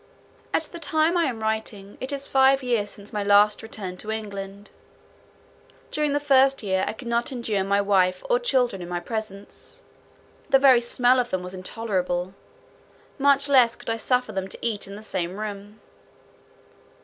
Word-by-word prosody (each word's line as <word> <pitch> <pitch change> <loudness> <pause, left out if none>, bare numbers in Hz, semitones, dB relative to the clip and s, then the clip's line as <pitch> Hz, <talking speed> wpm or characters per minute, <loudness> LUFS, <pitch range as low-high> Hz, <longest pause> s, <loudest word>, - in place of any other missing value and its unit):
At - - +1
the 340 +2 -7
time 320 +1 +1
I 340 -1 +3
am 235 -4 -3
writing, 220 -2 -3
it 260 +2 -4
is 280 -1 -1
five 270 0 +4
years 235 -5 0
since 205 +2 -10
my 210 -1 -1
last 205 +1 +4
return 200 -5 -7
to 215 - -8
England. 200 -2 -6 1.2
During 300 -1 0
the 290 - +2
first 270 -2 +3
year, 190 -2 0
I - - -2
could 240 +2 -10
not 235 +5 0
endure 225 -6 -1
my 200 +1 +2
wife 185 -2 +2
or - - +3
children 250 - +1
in 175 - -7
my 175 0 -2
presence; 205 +1 -6 0.7
the 270 - +6
very 265 -3 +6
smell 245 +1 +3
of 245 -1 -1
them 185 -1 -2
was 180 +1 -7
intolerable; 185 -2 -3 0.9
much 280 0 +4
less 255 -4 +5
could - - -5
I 225 - -1
suffer 250 0 0
them 190 -2 -3
to - - -7
eat 215 -4 -2
in 200 - -8
the 210 - -10
same 185 -3 -3
room. 205 0 -7
220 Hz, 175 wpm, -24 LUFS, 200-260 Hz, 1.2 s, the